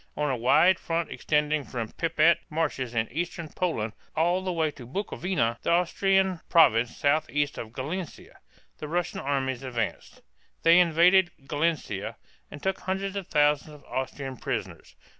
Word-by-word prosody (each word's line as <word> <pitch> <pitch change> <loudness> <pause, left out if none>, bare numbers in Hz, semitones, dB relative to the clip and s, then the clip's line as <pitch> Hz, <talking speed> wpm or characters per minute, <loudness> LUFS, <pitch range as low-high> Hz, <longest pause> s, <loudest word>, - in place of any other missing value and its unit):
On 150 -1 0
a - - 0
wide 130 +10 +4
front 165 0 -2
extending 150 0 0
from 115 -1 -4
the - - -16
Prip´et 165 0 +3
marshes 145 -7 -2
in 110 -1 +1
eastern 170 +2 -4
Poland 115 -14 -2 0.2
all 175 +3 +2
the 185 - -1
way 160 -3 0
to 125 -5 -12
Bukowina 130 - -16
(boo 200 - 0
ko - - -8
vee´nah), 120 -11 -1
the - - -2
Austrian 190 +1 +2
province 120 -8 +4
southeast 145 0 0
of 110 - -7
Galicia, 155 +8 -6 0.4
the 150 - -5
Russian 175 +2 -2
armies 135 -2 -1
advanced. 125 -3 -4 0.4
They 165 +2 +7
invaded 175 +2 +5 0.2
Galicia 155 +2 -2 0.3
and 145 - -11
took 190 0 -1
hundreds 190 +1 -3
of 195 -3 -4
thousands 150 0 +2
of 145 - -16
Austrian 130 0 -4
prisoners. - - -5
155 Hz, 160 wpm, -27 LUFS, 135-175 Hz, 0.4 s, They